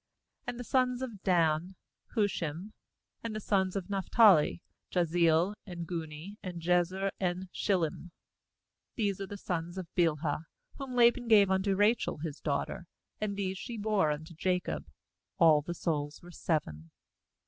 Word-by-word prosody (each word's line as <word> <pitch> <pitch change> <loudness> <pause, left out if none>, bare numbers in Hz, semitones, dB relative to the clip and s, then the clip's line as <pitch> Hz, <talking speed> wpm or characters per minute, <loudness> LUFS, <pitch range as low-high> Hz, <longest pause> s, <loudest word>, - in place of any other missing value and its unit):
^And 245 -1 -3
the 245 - -5
sons 255 0 +1
of 225 -7 -6
Dan: 170 -1 +2 0.4
Hushim. 190 -3 -1 0.5
^And 230 -1 -3
the - - -2
sons 190 -3 +1
of 195 -3 -3
Naphtali: 195 -4 +4 0.3
Jahzeel, 170 +1 +3
and 170 -2 -6
Guni, 165 +3 -6
and 180 -3 -6
Jezer, 180 +3 +1
and 180 0 -2
Shillem. 175 -3 -1 0.9
25These 200 -4 0
are 195 - -4
the 205 - -7
sons 175 -1 -4
of 185 - -4
Bilhah, 160 -2 +1 0.3
whom 265 -2 -5
Laban 240 0 +4
gave 205 -4 +6
unto 190 +1 +2
Rachel 210 +4 +2
his 150 -1 -5
daughter, 150 +4 -2 0.3
and 210 -1 -2
these 190 -1 -2
she 235 -2 -6
bore 210 -6 +2
unto 155 +3 -4
Jacob; 180 +2 -1 0.5
all 160 -4 +6
the 170 +4 -5
souls 145 -3 -2
were 175 - -11
seven. 80 - -2
185 Hz, 145 wpm, -31 LUFS, 165-205 Hz, 0.9 s, gave